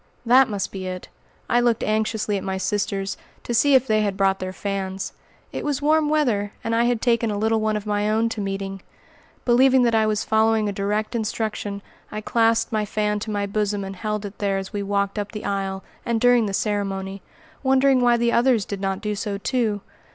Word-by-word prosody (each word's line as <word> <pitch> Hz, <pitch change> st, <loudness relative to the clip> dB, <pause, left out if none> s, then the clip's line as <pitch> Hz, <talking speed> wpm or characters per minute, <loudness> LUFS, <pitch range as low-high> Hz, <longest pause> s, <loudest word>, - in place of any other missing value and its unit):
That 255 Hz, +2 st, +6 dB
must 205 Hz, -2 st, -3 dB
be 190 Hz, -1 st, -5 dB
it! 185 Hz, 0 st, -6 dB, 0.4 s
I 240 Hz, -, +3 dB
looked 240 Hz, -2 st, +2 dB
anxiously 215 Hz, -1 st, 0 dB
at 195 Hz, -, -3 dB
my 190 Hz, 0 st, -2 dB
sisters, 195 Hz, 0 st, -2 dB, 0.3 s
to 240 Hz, -, -3 dB
see 275 Hz, +4 st, +4 dB
if 260 Hz, -1 st, +5 dB
they 215 Hz, -3 st, +2 dB
had 200 Hz, -2 st, -1 dB
brought 195 Hz, -1 st, +2 dB
their 185 Hz, 0 st, -4 dB
fans. 195 Hz, -1 st, -4 dB, 0.4 s
It -, -, -4 dB
was 290 Hz, -3 st, -1 dB
warm 305 Hz, +1 st, +2 dB
weather, 235 Hz, -10 st, +1 dB
and 230 Hz, -, -1 dB
I 230 Hz, +1 st, +3 dB
had 240 Hz, -2 st, 0 dB
taken 235 Hz, -2 st, +2 dB
a 205 Hz, -, -2 dB
little 220 Hz, +1 st, +1 dB
one 215 Hz, 0 st, +1 dB
of 210 Hz, -, -7 dB
my 210 Hz, 0 st, 0 dB
own 220 Hz, +2 st, +2 dB
to 225 Hz, -2 st, -4 dB
meeting. 195 Hz, -1 st, -4 dB, 0.6 s
Believing 260 Hz, +1 st, +5 dB
that 235 Hz, -1 st, +2 dB
I 220 Hz, -1 st, +3 dB
was 215 Hz, 0 st, 0 dB
following 220 Hz, 0 st, +2 dB
a -, -, 0 dB
direct 210 Hz, +3 st, -1 dB
instruction, 215 Hz, -3 st, -3 dB, 0.3 s
I 215 Hz, -, -4 dB
clasped 225 Hz, +1 st, +2 dB
my 215 Hz, -1 st, 0 dB
fan 210 Hz, 0 st, -1 dB
to 220 Hz, -, -6 dB
my 205 Hz, -1 st, -1 dB
bosom 205 Hz, 0 st, -1 dB
and 195 Hz, 0 st, -6 dB
held 210 Hz, +1 st, -3 dB
it 200 Hz, 0 st, -9 dB
there 200 Hz, -1 st, 0 dB
as 195 Hz, 0 st, -6 dB
we 205 Hz, -, -2 dB
walked 200 Hz, +1 st, -1 dB
up 205 Hz, +1 st, -5 dB
the 210 Hz, -, -6 dB
aisle, 195 Hz, -1 st, -2 dB, 0.2 s
and 235 Hz, -1 st, 0 dB
during 245 Hz, -2 st, +4 dB
the -, -, -3 dB
ceremony, 195 Hz, -2 st, -2 dB, 0.4 s
wondering 265 Hz, -1 st, +4 dB
why 240 Hz, -1 st, +4 dB
the 235 Hz, 0 st, +2 dB
others 235 Hz, -4 st, +3 dB
did 200 Hz, -1 st, -5 dB
not 195 Hz, 0 st, -2 dB
do 210 Hz, -1 st, -2 dB
so, 205 Hz, -1 st, -3 dB
too. 215 Hz, -1 st, -1 dB
210 Hz, 215 wpm, -23 LUFS, 200-230 Hz, 0.6 s, That